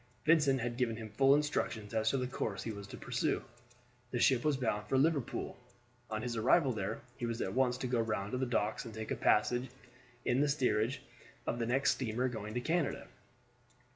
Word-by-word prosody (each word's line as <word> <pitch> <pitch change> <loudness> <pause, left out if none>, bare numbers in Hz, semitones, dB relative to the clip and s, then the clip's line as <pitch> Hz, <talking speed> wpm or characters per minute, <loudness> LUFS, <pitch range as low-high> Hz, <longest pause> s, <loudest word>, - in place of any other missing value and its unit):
Vincent 150 -5 +4
had 120 0 -3
given 120 -3 +1
him 110 -2 -7
full 135 +5 +5
instructions 120 -7 -1
as 110 0 +2
to 135 - +1
the 130 - -1
course 110 -5 -3
he 115 - -3
was 100 -1 -8
to - - -9
pursue. - - -1 0.7
The 120 - -2
ship 125 0 +4
was 150 -3 +2
bound 105 -5 -1
for 135 - +2
Liverpool; 145 -2 0 0.5
on 110 0 -3
his 120 -1 -2
arrival 130 +5 +4
there 105 +1 -3 0.2
he 120 - -2
was 115 0 -3
at - - -2
once 125 -1 +2
to 130 - -4
go 125 -2 +1
round 105 -2 -2
the 130 +1 0
docks 110 -3 0
and 115 -2 -9
take 110 0 -5
a - - +1
passage 120 +4 +2 0.6
in 125 +3 +2
the 145 - +3
steerage 125 -2 +1 0.4
of 120 - -2
the 115 - -1
next 130 +3 +3
steamer 125 0 -1
going 110 -2 -6
to 125 - 0
Canada. 165 +2 -1
120 Hz, 200 wpm, -33 LUFS, 110-135 Hz, 0.7 s, full